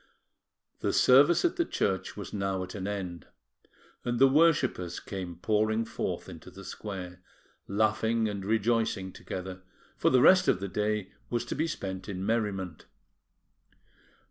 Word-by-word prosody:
The - - 0
service 145 - +6
at 350 +1 +1
the 340 - +3
church 95 - -2
was - - -7
now 95 -2 -1
at 90 - -8
an 100 -2 -4
end; 90 -6 -5 0.8
and 120 0 -1
the 135 +2 +7
worshippers 135 - +2
came 90 -3 -6
pouring 110 +4 +1
forth - - -4
into - - -10
the 95 - -12
square, 90 -3 -7 0.5
laughing 110 +2 +1
and 100 -2 -4
rejoicing 110 -3 0
together, 90 0 -6 0.3
for - - +2
the 130 -1 +4
rest 185 -1 +7
of - - +3
the 100 - -3
day 105 0 -1 0.2
was 120 0 -1
to - - -4
be 160 +3 0
spent 95 - -5
in 95 -1 -4
merriment. 100 -7 -2
105 Hz, 145 wpm, -29 LUFS, 95-115 Hz, 0.8 s, the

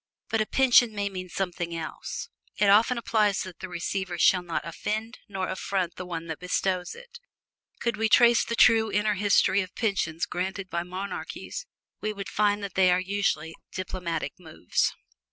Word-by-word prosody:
But 225 - +1
a 215 - 0
pension 245 -4 +5
may 200 0 -1
mean 185 -2 -6
something 175 -2 -3
else: 165 - -5 0.3
it 205 -1 +4
often 225 +4 +5
implies 215 -3 +1
that 185 -2 -10
the 190 - -6
receiver 180 +1 -3
shall 180 +2 +5
not 170 -3 -3
offend 215 +6 -4
nor 190 -2 -2
affront 185 -3 -2
the 180 - -7
one 165 -2 -4
that 160 -2 -5
bestows 180 0 -1
it. 475 0 -13 0.6
Could 235 -2 -1
we 220 0 +1
trace 235 +1 +6
the 235 - -3
true 220 -1 +5
inner 210 +1 +2
history 200 0 +3
of 185 -2 -8
pensions 170 -7 0
granted 190 +1 -4
by 170 - 0
monarchies, 190 - -6 0.3
we 215 0 -1
would 200 -1 -6
find 205 0 +1
that 195 -3 -5
they 185 -1 +4
are 180 - +3
usually 185 -5 -1 0.2
diplomatic 175 -5 -3
moves. 160 - -1
195 Hz, 170 wpm, -27 LUFS, 180-215 Hz, 0.6 s, trace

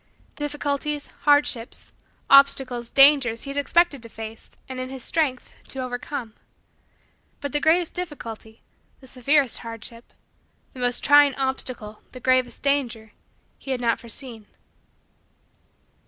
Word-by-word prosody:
Difficulties, 295 0 -3
hardships, 290 -5 +1 0.4
obstacles, 270 -4 +4
dangers, 275 -5 +5
he 275 - -5
had 280 - -6
expected 290 0 +2
to 230 - -9
face, 220 0 -10
and, 260 -1 -6
in 255 0 -4
his 265 -2 -7
strength, 285 -6 -1
to - - -7
overcome. 250 -1 -5 1.1
But 285 -1 -5
the 295 - +1
greatest 325 +3 +2
difficulty, 230 -10 -7 0.4
the 265 - -16
severest 265 +1 +1
hardship, 230 0 -9 0.6
the 260 - -11
most 245 -1 +1
trying 290 -1 +6
obstacle, 255 -5 -4
the 255 - -9
gravest 255 0 +1
danger, 245 -6 -1 0.5
he - - -11
had 260 -2 -1
not 235 -1 +1
foreseen. 235 -2 -7
260 Hz, 125 wpm, -24 LUFS, 235-285 Hz, 1.1 s, trying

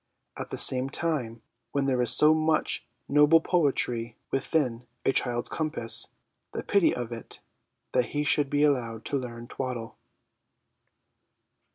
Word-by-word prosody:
At - - -7
the - - -5
same 130 +1 +5
time, 130 -8 -3 0.3
when 140 -1 0
there 130 -2 +1
is 120 - +3
so 150 +6 +7
much 155 0 0 0.2
noble 150 +3 +5
poetry 125 -9 0
within 130 -3 -1 0.2
a - - +4
child's 120 -1 0
compass, 155 -7 0 0.5
the - - -4
pity 200 -4 +3
of 120 -1 -5
it, 115 -2 -9 0.5
that 125 - +2
he 145 0 -3
should 145 -1 +2
be 145 +1 +1
allowed 120 -6 0
to 140 - -1
learn 120 -2 -8
twaddle 125 -3 -6
130 Hz, 140 wpm, -27 LUFS, 120-150 Hz, 0.5 s, so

